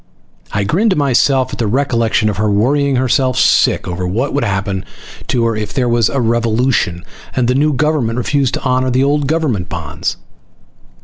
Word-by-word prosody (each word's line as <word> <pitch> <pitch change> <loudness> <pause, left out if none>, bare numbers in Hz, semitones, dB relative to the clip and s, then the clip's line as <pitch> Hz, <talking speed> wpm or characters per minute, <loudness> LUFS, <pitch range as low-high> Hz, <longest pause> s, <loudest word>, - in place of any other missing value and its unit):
I 100 - -1
grinned 190 - +1
to 190 - +2
myself 135 -1 +2
at - - -6
the 115 - 0
recollection 115 -2 +1
of 105 - -1
her 105 0 +1
worrying 135 +7 +1
herself 130 0 +1
sick - - +3
once 90 - -4
over 90 +1 -3
what 120 +10 -2
would 145 - 0
happen 95 -1 -2 0.4
to 120 -3 0
her 115 -1 0
if 105 -1 -5
there 125 -2 +1
was 120 -2 +2
a 140 - -1
revolution 115 -5 0 0.3
and 125 -2 +1
the 125 - +2
new 150 +3 +2
government 140 -5 0
refused 135 +1 0
to - - -6
honor 130 0 +1
the 130 +1 +2
old 145 0 +1
government 135 - -1
bonds. 80 -4 -4
125 Hz, 190 wpm, -15 LUFS, 110-140 Hz, 0.4 s, sick